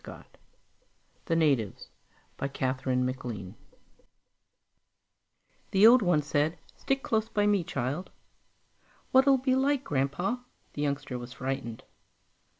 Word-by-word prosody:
_ - - -10 1.0
The 165 - 0
Natives 140 -11 +1 0.5
by 140 - -3
KATHERINE 130 -1 -1
MACLEAN 120 -7 -5 2.2
The 195 +2 +5
old 245 +2 +8
one 175 -6 +2
said, 150 +3 0 0.2
"Stick 270 0 -1
close 220 0 0
by 205 -1 +1
me, 205 -3 +3
child." 145 +1 -3 1.0
"What'll 265 +1 +6
it 260 - -4
be 260 -1 +2
like, 275 +1 +2
Grandpa?" 145 - -1 0.4
The 145 - -4
youngster 140 -3 -2
was 120 +1 -9
frightened. 130 -4 -4
150 Hz, 115 wpm, -29 LUFS, 130-215 Hz, 2.2 s, old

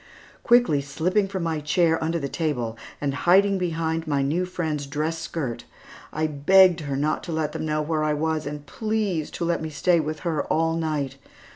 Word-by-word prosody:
Quickly 240 -12 +4
slipping 180 +9 0
from 190 -2 -4
my 165 -2 -1
chair, 160 +2 +2
under 165 +1 0
the 140 -4 -3
table, 130 -8 -2 0.2
and 140 -1 -1
hiding 190 +6 +4
behind 165 -2 -1
my 140 -2 +1
new 165 +7 0
friend's 155 -5 -3
dress 155 +3 -2
skirt, 150 -8 -4 0.5
I 155 +1 -1
begged 175 +5 +5
her 140 -3 -3
not 150 +2 0
to 170 - -5
let 160 -2 -1
them 155 - -4
know 150 0 0
where 155 0 -1
I 150 0 +1
was, 155 0 -1
and 145 0 -6
please, 215 -7 -2
to 170 - -4
let 170 -1 0
me 160 - -4
stay 170 +3 +2
with 155 -1 -3
her 160 -4 -1
all 165 +1 +1
night. 150 -5 -2
160 Hz, 190 wpm, -24 LUFS, 150-170 Hz, 0.5 s, begged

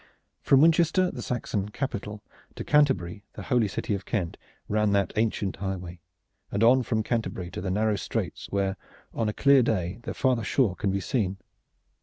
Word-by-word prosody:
From 135 -1 +5
Winchester, 170 +3 +4
the - - -7
Saxon 105 -4 -2
capital, 105 -4 -5 0.3
to - - -5
Canterbury, 105 - +2
the - - -8
holy 120 -5 +2
city 100 - -3
of 100 -1 -3
Kent, 95 -7 -2 0.3
ran 105 -1 +1
that 100 -1 +1
ancient 105 -3 0
highway, 90 -3 -5 0.5
and 100 +2 0
on 130 +3 +6
from 110 -3 -1
Canterbury 110 -6 -3
to - - -5
the 95 - -3
narrow 105 +2 +1
straits - - -4
where, 95 -1 -1 0.4
on 110 -2 0
a - - 0
clear 140 +4 +5
day, 95 -4 -1
the - - -6
farther 130 -4 +1
shore 110 -3 +1
can 100 - -1
be 100 0 -1
seen. 95 -2 -1
105 Hz, 175 wpm, -27 LUFS, 95-125 Hz, 0.5 s, on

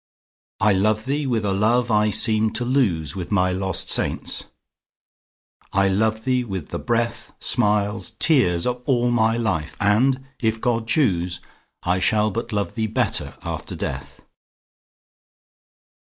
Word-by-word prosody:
I 105 0 +4
love 110 +3 +1
thee 140 +2 -1
with 115 -4 0
a 100 - +1
love 115 +4 +2
I 105 0 +3
seemed 110 0 +1
to 120 +2 -2
lose 95 - +1
With 90 -1 -6
my 90 -2 +2
lost 95 0 -1
saints,—I 100 0 -4
love 110 +3 0
thee 125 -1 +1
with 95 -9 -6
the - - -4
breath, 120 -1 -2
Smiles, 105 -2 +1
tears, 90 - +3
of 125 0 -2
all 120 -3 +2
my 115 -1 +2
life!—and, 110 - +1
if 110 -2 0
God 115 -1 -1
choose, 90 - +1 0.4
I 90 +1 +1
shall 105 +2 +2
but 115 +3 -4
love 105 -1 -2
thee 110 -2 -1
better 110 - -1
after - - -5
death. 70 0 -6
110 Hz, 135 wpm, -22 LUFS, 95-120 Hz, 0.4 s, I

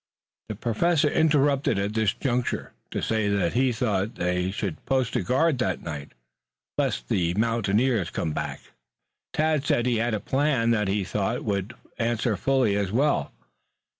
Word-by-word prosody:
The 110 - -3
Professor 145 - +1
interrupted 145 -6 +3
at 100 +2 -1
this 110 -3 +2
juncture 125 0 -2 0.2
to - - -3
say 110 -2 +1
that 100 -4 +1
he 130 +1 +3
thought 110 -2 -1
they 90 +1 0
should 95 -4 -4
post 130 -3 +1
a 125 - +2
guard 130 - +2
that 95 -8 -1
night 75 -4 -6 0.6
lest - - -1
the 85 +2 +1
mountaineers 115 -2 +1
come 80 - -2
back. - - -4 0.7
Tad 155 -2 +1
said 120 -4 +1
he 125 -2 +2
had 115 0 0
a - - -2
plan 130 0 +1
that 105 -3 +1
he 100 +1 0
thought 105 +5 -2
would 100 +2 -2 0.2
answer 115 -1 0
fully 125 0 +2
as 100 -2 -1
well. 140 +6 +1
115 Hz, 160 wpm, -26 LUFS, 100-130 Hz, 0.7 s, interrupted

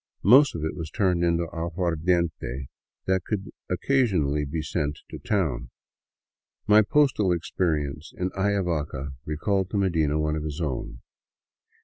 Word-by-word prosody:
Most 135 +8 +6
of 80 - -4
it 80 - -3
was 85 -3 -5
turned 90 -4 +1
into 85 0 +2
aguardiente 85 -5 -1 0.4
that 95 -1 +1
could 100 -1 -3 0.2
occasionally 90 - +1
be 80 +3 -3
sent 75 -1 -2
to - - -7
town. 95 - -1 1.0
My 105 +1 +7
postal 120 -5 +3
experience 80 -4 -1
in 90 0 -1
Ayavaca 90 -8 -1 0.2
recalled 95 +5 0
to 105 - -2
Medina 80 -6 +1
one 75 0 0
of 75 - -3
his 75 -1 -5
own. 65 -5 -4
85 Hz, 130 wpm, -26 LUFS, 75-95 Hz, 1.0 s, My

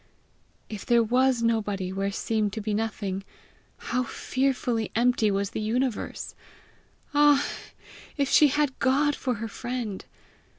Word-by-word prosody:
If 215 -3 -7
there 235 -1 +4
was 250 +1 +2
nobody 205 -5 0
where 195 +1 -1
seemed 210 0 -1
to 220 - -3
be 210 0 -2
nothing, 205 -3 -2 0.5
how 250 - -1
fearfully 250 -3 -1
empty 235 -2 +3
was 200 0 -1
the - - -3
universe! 235 +2 -2 0.8
Ah, 290 -1 +5 0.7
if 280 -1 +1
she 300 +2 +6
had 290 -1 0
God 285 +3 +2
for 250 -3 -2
her 225 +2 -4
friend! 235 -2 -4
230 Hz, 130 wpm, -26 LUFS, 210-260 Hz, 0.8 s, she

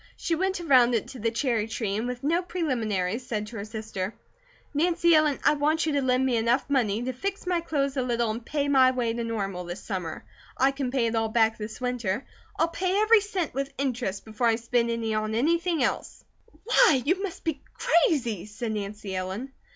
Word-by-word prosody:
She 335 - -1
went 375 +3 0
around 255 -7 +5
it 220 - -2
to 260 - -9
the 230 +1 +1
cherry 230 -2 0
tree 220 -3 -2
and 220 +3 -2
with 250 0 -5
no 330 +5 +2
preliminaries 235 - -1
said 215 -4 -3
to 225 +2 -9
her 200 - -4
sister: 215 -2 -5 0.6
"Nancy 340 +2 +3
Ellen, 310 -3 +4
I - - +5
want 305 +2 +1
you 315 - 0
to 285 -1 +1
lend 255 0 +2
me 250 -3 +2
enough 235 +4 +1
money 240 -6 +1
to 255 +1 -2
fix 390 +11 -4
my 355 -2 +1
clothes 280 -4 -1
a - - +2
little 235 -2 0
and 230 +2 -5
pay 285 +3 -1
my 265 -2 +6
way 245 -3 0
to 235 0 -3
Normal 195 -5 -3
this 175 +3 -7
summer. 180 -6 -5 0.3
I 265 +2 +4
can 270 -2 -3
pay 250 -2 +1
it 230 - 0
all 225 -1 +1
back 225 0 +2
this 215 +1 -6
winter. 245 -3 -2 0.3
I'll 330 - +2
pay 365 +3 0
every 430 0 +6
cent 390 -5 -3
with 275 +2 -3
interest, 245 -7 -2
before 220 +2 -1
I 225 - +4
spend 235 +1 0
any 230 -1 -1
on 215 0 -1
anything 330 +4 +1
else." - - -2 0.4
"Why, 410 - +5
you 360 +6 +1
must 395 -4 -5
be 315 -4 -2 0.2
crazy!" 250 - +2
said 220 +2 -4
Nancy 205 -2 -5
Ellen. 190 +8 -4
245 Hz, 210 wpm, -27 LUFS, 220-300 Hz, 0.6 s, my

